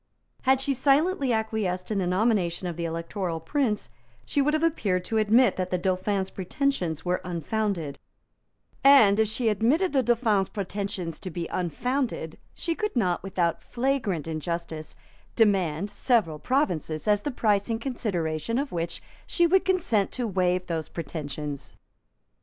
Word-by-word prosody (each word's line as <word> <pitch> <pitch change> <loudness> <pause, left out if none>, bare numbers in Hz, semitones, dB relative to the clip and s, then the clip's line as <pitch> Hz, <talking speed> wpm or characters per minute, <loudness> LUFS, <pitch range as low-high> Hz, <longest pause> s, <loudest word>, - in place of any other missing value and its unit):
Had 265 0 +3
she 275 +1 0
silently 280 +2 +2
acquiesced 220 -4 -1
in 205 - +1
the 180 - 0
nomination 185 -3 +1
of 175 - -4
the 170 0 -3
Electoral 165 +1 -3
Prince, 215 - -1 0.4
she 285 - +1
would 300 +2 +2
have 310 - 0
appeared 200 - +1
to 220 +2 0
admit 225 +4 +4
that 185 -1 -1
the 180 - 0
Dauphin's 190 +2 -1
pretensions 185 - -2
were 180 0 0
unfounded; 175 -2 -2 0.8
and, 225 -7 +7
if 220 - +4
she 225 +3 -1
admitted 250 - +2
the 270 - +4
Dauphin's 225 -5 +2
pretensions 195 -4 -4
to 185 - -6
be 170 0 -4
unfounded, 185 - -2 0.2
she 335 - -1
could 425 +1 -3
not, 185 -7 +1
without 175 -3 -1
flagrant 235 - -1
injustice, 160 -1 -4 0.4
demand 195 -4 +2
several 205 - +1
provinces 175 - -1
as 205 -1 +3
the 290 - -2
price 210 -6 +1
in 225 - 0
consideration 215 - -2
of 275 0 -2
which 170 0 -3 0.2
she 345 - +3
would 370 +2 +4
consent 340 - +1
to 250 - -1
waive 180 -3 +1
those 165 -3 -3
pretensions. 150 -3 -5
200 Hz, 150 wpm, -26 LUFS, 175-250 Hz, 0.8 s, and